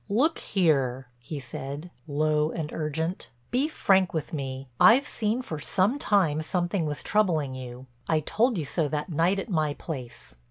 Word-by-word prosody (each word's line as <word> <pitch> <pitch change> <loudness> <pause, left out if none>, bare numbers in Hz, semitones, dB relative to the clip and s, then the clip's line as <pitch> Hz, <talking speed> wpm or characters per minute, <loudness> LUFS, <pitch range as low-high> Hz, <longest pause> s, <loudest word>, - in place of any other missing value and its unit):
"Look 275 +11 +2
here," 135 -9 +1
he 140 +5 -6
said, 140 +6 -6 0.2
low 150 +1 +1
and 155 -2 -4
urgent, 160 +3 -3 0.2
"be 260 +4 +2
frank 190 - +2
with 155 0 -3
me. 135 -2 -4
I've 260 +5 +7
seen 225 +1 -1
for 155 -10 -5
some 195 - +1
time 185 - +2
something 175 +1 -1
was 145 -3 -4
troubling 165 -10 +1
you—I 125 +3 -4
told 230 - +1
you 160 - -2
so 150 +3 0
that 150 +3 -3
night 170 +4 +2
at 195 - -3
my 155 -7 0
place. 125 - -8
155 Hz, 160 wpm, -27 LUFS, 140-195 Hz, 0.2 s, I've